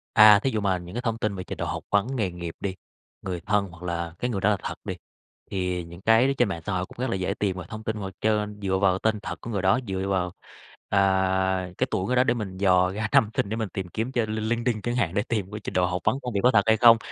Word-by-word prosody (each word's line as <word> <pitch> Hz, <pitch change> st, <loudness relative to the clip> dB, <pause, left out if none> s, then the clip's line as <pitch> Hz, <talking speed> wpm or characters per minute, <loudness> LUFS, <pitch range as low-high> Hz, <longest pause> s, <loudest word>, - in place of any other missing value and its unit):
À, 105 Hz, -1 st, +9 dB
thí 135 Hz, -, 0 dB
dụ 110 Hz, -, -1 dB
mà 95 Hz, -2 st, +1 dB
những 90 Hz, +2 st, -9 dB
cái 120 Hz, -, -2 dB
thông 115 Hz, -2 st, -1 dB
tin 110 Hz, -3 st, -1 dB
về 90 Hz, -, -5 dB
trình -, -, -7 dB
độ -, -, -2 dB
học -, -, -4 dB
vấn, 100 Hz, +2 st, +3 dB
nghề 100 Hz, -7 st, 0 dB
nghiệp 85 Hz, -1 st, -6 dB
đi, 95 Hz, -2 st, -3 dB, 0.5 s
người 90 Hz, -3 st, -4 dB
thân, 105 Hz, +1 st, +1 dB
hoặc 85 Hz, +1 st, -13 dB
là 85 Hz, -1 st, -3 dB
cái 125 Hz, -, -1 dB
người 100 Hz, -5 st, -2 dB
đó 105 Hz, -, +3 dB
là 105 Hz, -, +2 dB
thật -, -, -4 dB
đi, -, -, -2 dB, 0.6 s
thì 90 Hz, -2 st, -1 dB
những 85 Hz, +2 st, -11 dB
cái 115 Hz, +4 st, +5 dB
ở 135 Hz, -, +2 dB
trên 120 Hz, -, +3 dB
mạng 85 Hz, -3 st, -4 dB
xã 100 Hz, -, -2 dB
hội 90 Hz, 0 st, -1 dB
cũng -, -, -16 dB
rất 130 Hz, -, -1 dB
là 115 Hz, -, 0 dB
dễ 95 Hz, +1 st, -1 dB
tìm 100 Hz, -2 st, -1 dB
về 90 Hz, -, -6 dB
thông 110 Hz, 0 st, -7 dB
tin, 110 Hz, 0 st, -2 dB
hoặc 95 Hz, -2 st, -5 dB
trên 105 Hz, -1 st, 0 dB
dựa 95 Hz, -1 st, +1 dB
vào 95 Hz, -1 st, +2 dB
tên 110 Hz, -1 st, +1 dB
thật -, -, -6 dB
của 115 Hz, -, -7 dB
người 100 Hz, -4 st, -1 dB
đó, 95 Hz, +7 st, +3 dB
dựa 95 Hz, 0 st, -2 dB
vào, 90 Hz, -2 st, 0 dB, 0.6 s
à, 95 Hz, -1 st, +2 dB
cái -, -, +1 dB
tuổi 95 Hz, -, -1 dB
người 125 Hz, -, +1 dB
đó 125 Hz, -, +5 dB
để 130 Hz, -, +2 dB
mình 100 Hz, -6 st, -5 dB
dò 90 Hz, -1 st, +3 dB
ra 105 Hz, +2 st, -2 dB
năm 105 Hz, -, +5 dB
sinh 100 Hz, -, +1 dB
để 110 Hz, -, -2 dB
mình 110 Hz, -3 st, -2 dB
tìm 95 Hz, -1 st, -5 dB
kiếm 115 Hz, +7 st, -3 dB
trên 115 Hz, -4 st, 0 dB
LinkedIn 115 Hz, 0 st, -1 dB
chẳng 120 Hz, +3 st, -2 dB
hạn, 100 Hz, -9 st, 0 dB
để 100 Hz, -, +2 dB
tìm 105 Hz, -4 st, -1 dB
cái 105 Hz, -, -5 dB
trình -, -, -5 dB
độ 90 Hz, -1 st, +3 dB
học 90 Hz, 0 st, -2 dB
vấn 135 Hz, -, +1 dB
công 125 Hz, -, -4 dB
việc 100 Hz, -, +1 dB
có 125 Hz, -, +6 dB
thật 105 Hz, -4 st, +4 dB
hay 110 Hz, 0 st, +4 dB
không, 115 Hz, 0 st, +8 dB
100 Hz, 300 wpm, -26 LUFS, 95-110 Hz, 0.6 s, À